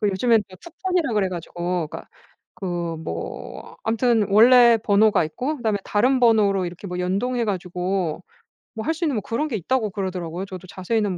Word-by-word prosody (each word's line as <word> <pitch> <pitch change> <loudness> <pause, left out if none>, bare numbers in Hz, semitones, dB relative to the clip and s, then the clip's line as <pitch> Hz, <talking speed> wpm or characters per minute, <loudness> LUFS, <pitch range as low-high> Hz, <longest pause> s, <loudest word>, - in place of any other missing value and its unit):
그 210 - +2
요즘엔 220 +3 +3
다 185 - -13
투폰이라 345 - -2
그래 195 -3 +2
가지고 175 -1 -3
그러니까 - - -9 0.5
그 185 +1 -7 0.3
뭐 85 - -7
암튼 225 -1 +2
"원래 235 +2 +7
번호가 210 -2 +4
있고 260 - -3
그다음에 220 -4 0
다른 255 +5 +2
번호로 205 -5 +4
이렇게 175 +3 -8
뭐 180 -1 -5
연동해 230 +7 -1
가지고 180 -3 -2 0.5
뭐 220 - -5
할 320 - +1
수 330 +2 -6
있는 290 -6 +1
뭐 210 - -1
그런 270 +10 -2
게 230 - -2
있다."고 220 +3 0
그러더라고요. 185 -2 -4
저도 185 -1 -9
자세히는 195 0 -1
205 Hz, 385 characters per minute, -23 LUFS, 185-235 Hz, 0.5 s, 원래